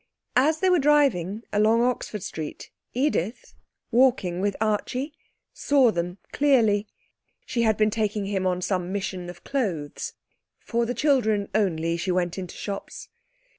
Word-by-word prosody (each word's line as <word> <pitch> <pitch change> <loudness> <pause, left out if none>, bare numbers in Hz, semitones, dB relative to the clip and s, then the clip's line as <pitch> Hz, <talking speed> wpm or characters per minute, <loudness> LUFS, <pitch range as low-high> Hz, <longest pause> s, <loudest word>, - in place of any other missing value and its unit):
As 310 +4 +2
they 375 - +4
were 360 - +4
driving 235 - +2
along 220 +3 +4
Oxford 240 -5 -2
Street 155 -6 -6 0.2
Edith, 250 - -1 0.4
walking 230 -8 +3
with 200 0 0
Archie, 245 +7 -1 0.4
saw 270 -5 +3
them 175 0 -3
clearly. 225 -8 +3 0.6
She 235 - -1
had 220 -2 +3
been 215 0 +3
taking 210 -2 -1
him 195 -2 -1
on 180 0 -1
some 180 -2 -1
mission 190 -3 -3
of 175 - -11
clothes. 185 - -3 0.5
(For 235 0 -1
the 245 - -2
children 220 -7 +2
only 170 -5 +1
she 180 +3 -3
went 180 0 0
into 180 -2 -7
shops.) 200 -1 -6
210 Hz, 140 wpm, -25 LUFS, 185-245 Hz, 0.6 s, they